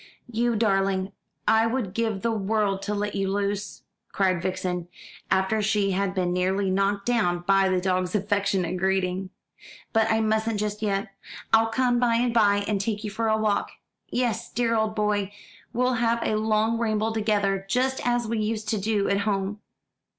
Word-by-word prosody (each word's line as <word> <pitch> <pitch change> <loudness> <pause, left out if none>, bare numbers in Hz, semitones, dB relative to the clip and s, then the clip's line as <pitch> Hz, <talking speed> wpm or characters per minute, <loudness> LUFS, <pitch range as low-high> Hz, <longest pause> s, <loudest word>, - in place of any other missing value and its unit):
"You 235 +1 +1
darling, 195 -2 +1 0.4
I 220 +1 +4
would 230 -6 -2
give 220 -3 -1
the 230 - +1
world 205 -2 0
to 210 - -2
let 205 0 -2
you 195 -1 -1
loose," 205 0 -2 0.3
cried 185 -3 +1
Vixen, 180 -1 -2 0.4
after 190 +3 +2
she 205 -1 +1
had 195 0 -1
been 180 -2 0
nearly 190 +2 0
knocked 200 +1 0
down 210 -8 +1
by 195 0 +4
the 185 -1 +2
dog's 185 0 0
affectionate 195 -3 0
greeting; 190 0 0 0.6
"but 225 0 +3
I 220 - +2
mustn't 220 0 0
just 210 0 -3
yet. 200 0 -1 0.4
I'll 225 0 +6
come 245 +1 +1
by 240 -1 +2
and 240 0 +1
by 205 -3 +3
and 205 -2 0
take 210 0 -2
you 210 - -4
for 225 +2 -1
a 220 0 +3
walk. 215 -2 0 0.4
Yes, 235 -2 -1
dear 230 -1 0
old 220 -1 0
boy, 210 -2 0 0.4
we'll 250 +2 +1
have 235 0 +2
a - - 0
long 220 +1 +1
ramble 220 -1 0
together, 205 -3 0
just 260 +4 +1
as 240 -1 +1
we 225 0 -1
used 215 0 -2
to 215 - 0
do 205 0 0
at 200 - +1
home." 200 0 -1
210 Hz, 175 wpm, -25 LUFS, 195-225 Hz, 0.6 s, I'll